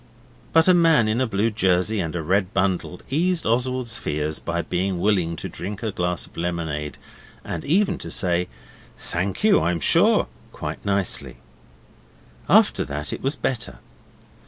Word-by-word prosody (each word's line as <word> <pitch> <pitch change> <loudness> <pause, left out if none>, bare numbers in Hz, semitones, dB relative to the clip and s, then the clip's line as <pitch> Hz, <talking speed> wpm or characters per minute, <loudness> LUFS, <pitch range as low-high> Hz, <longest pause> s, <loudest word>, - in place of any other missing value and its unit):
But 165 +1 +5
a 185 - +7
man 165 -9 +4
in 110 +4 +1
a 130 - +1
blue 110 +1 0
jersey 95 0 +1
and 85 -2 -3
a 85 - -2
red 95 +3 0
bundle 95 -2 0
eased 175 +4 +1
Oswald's 125 0 0
fears 75 +1 -2
by 85 0 -2
being 95 +1 -1
willing 90 -3 +1
to - - -5
drink 100 +5 -6
a 110 - -1
glass 90 -2 -1
of - - -20
lemonade, 80 -4 -3 0.5
and 80 - -4
even 185 +4 +2
to - - -6
say, 90 -1 0 0.5
'Thank 95 - -3
you, 215 -2 +5
I'm 85 0 0
sure' 75 - +4 0.3
quite - - -6
nicely. 100 -2 -1 1.1
After - - +5
that 75 +1 -4
it - - -5
was 135 +3 -1
better. 115 - -3
95 Hz, 160 wpm, -23 LUFS, 85-120 Hz, 1.1 s, a